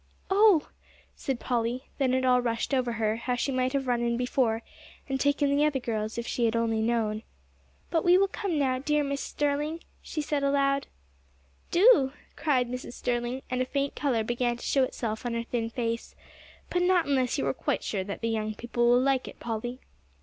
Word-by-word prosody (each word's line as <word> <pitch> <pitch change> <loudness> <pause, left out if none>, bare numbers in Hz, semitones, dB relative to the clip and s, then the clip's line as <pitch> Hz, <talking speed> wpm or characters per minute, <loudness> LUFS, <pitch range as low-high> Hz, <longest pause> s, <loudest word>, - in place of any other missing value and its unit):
"Oh!" 395 -5 +5 0.5
said 265 -3 -3
Polly. 245 +1 -1 0.2
Then 260 -2 +2
it 260 0 +1
all 250 -1 +4
rushed 235 +3 -2
over 250 -3 +1
her 220 -1 0
how 245 +1 -1
she 260 +3 -1
might 255 0 +1
have 275 -1 0
run 245 -1 +1
in 235 0 0
before, 245 -2 0 0.4
and 270 -1 -1
taken 285 0 +2
the 290 - +3
other 300 -2 +2
girls 220 -3 -3
if 235 - -3
she 240 - 0
had 225 0 +1
only 225 -1 +1
known. 220 -2 0 0.7
"But 325 -2 +2
we 355 +1 +6
will 395 +1 +4
come 385 -4 -2
now, 260 -3 +1
dear 300 +2 +1
Mrs. 280 0 -2
Sterling," 295 +4 -1 0.2
she 315 - -5
said 295 -1 -1
aloud. 275 0 +2 0.8
"Do," 345 - +5 0.2
cried 260 -5 +1
Mrs. 250 0 -6
Sterling, 245 +2 -2
and 255 0 0
a - - +1
faint 280 +1 -1
color 250 -6 0
began 240 +1 0
to - - -9
show 270 - +3
itself 225 -4 -3
on 240 -1 -2
her 230 - -1
thin 230 -1 -2
face, 230 -1 -3 0.6
"but 355 - +1
not 360 -1 +3
unless 260 -3 +1
you - - 0
are 135 - +1
quite - - -2
sure 195 -3 -2
that 200 +1 -6
the 230 - 0
young 215 -1 -2
people 240 +1 0
will 245 +1 +6
like 270 -1 +1
it, - - -10
Polly." 240 +2 -4
255 Hz, 200 wpm, -28 LUFS, 235-280 Hz, 0.8 s, we